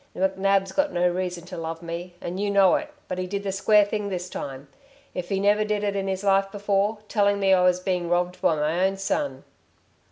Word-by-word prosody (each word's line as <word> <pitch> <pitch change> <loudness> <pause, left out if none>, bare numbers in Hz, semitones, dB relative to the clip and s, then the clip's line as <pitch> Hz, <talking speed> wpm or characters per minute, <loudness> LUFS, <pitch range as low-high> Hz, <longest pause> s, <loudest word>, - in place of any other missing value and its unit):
McNab's 195 +1 +1
got 290 +7 +1
no 175 0 +2
reason 180 -1 -3
to 180 0 -8
love 165 0 -5
me 170 +1 -6
and 180 +2 -5
you 205 0 0
know 195 -2 +5
it... 300 -1 -1 0.2
but 185 - -4
he 185 - -2
did 200 +2 -3
the 195 - -2
square 205 +2 +4
thing 205 0 -3
this 180 -1 -4
time 135 0 -6 0.5
if 180 -1 -5
he 195 - 0
never 205 +2 +3
did 210 -1 -1
it 200 -1 -1
in 195 -1 -2
his 190 0 -2
life 195 0 +2
before, 205 +1 0
telling 205 -1 +2
me 195 -1 +4
I 185 - +4
was 180 0 +3
being 180 -2 -2
robbed 175 +1 0
by 160 - +3
my 155 +4 0
own 195 +1 +1
son." 235 +9 -2
190 Hz, 225 wpm, -25 LUFS, 180-200 Hz, 0.5 s, know